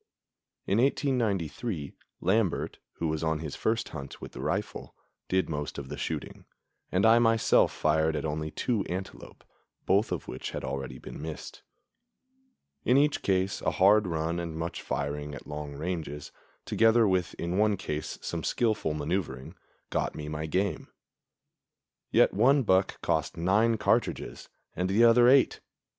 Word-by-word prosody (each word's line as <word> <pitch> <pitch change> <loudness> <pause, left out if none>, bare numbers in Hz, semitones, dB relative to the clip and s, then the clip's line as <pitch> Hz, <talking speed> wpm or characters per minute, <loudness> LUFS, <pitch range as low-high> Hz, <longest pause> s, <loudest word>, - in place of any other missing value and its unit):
In 100 - +1
1893, 115 - 0 0.3
Lambert, 100 -2 0
who 85 - -3
was 80 0 -2
on 80 -1 +1
his 75 -2 -6
first 110 0 -1
hunt 70 0 -8
with - - -9
the - - -8
rifle, - - -3 0.3
did 95 0 +2
most 75 -2 -4
of 70 -2 -6
the - - -4
shooting, - - -5 0.5
and 95 +4 +2
I 115 +1 +7
myself 115 -1 +4
fired 80 +1 +1
at 75 - -2
only 75 0 -2
two 110 +6 -1
antelope, 95 +2 -7 0.4
both 100 +4 +2
of - - -3
which - - -5
had - - -5
already 70 -1 -4
been - - -9
missed. 80 0 -7 1.2
In 125 - +4
each 145 +1 +3
case 95 0 0
a - - +1
hard 100 +2 +4
run 85 0 -1
and 85 -2 -5
much 85 +1 -4
firing 75 0 -3
at - - -10
long 75 -1 -6
ranges, 80 -2 -4 0.3
together 115 0 +4
with 90 -2 0
in 85 +3 -2
one 105 -1 +3
case 75 -5 -4
some - - -3
skillful 110 -10 0
maneuvering, 75 -4 -3 0.4
got - - -1
me 75 - -6
my 75 +1 -4
game; 95 +4 -1 1.2
yet - - +4
one 130 +8 +4
buck 95 -2 +2
cost - - -1
nine 105 +7 +3
cartridges 110 +2 -1 0.3
and 90 +1 -1
the 105 +5 +4
other 120 +1 +7
eight. 135 0 +4
90 Hz, 150 wpm, -28 LUFS, 75-110 Hz, 1.2 s, I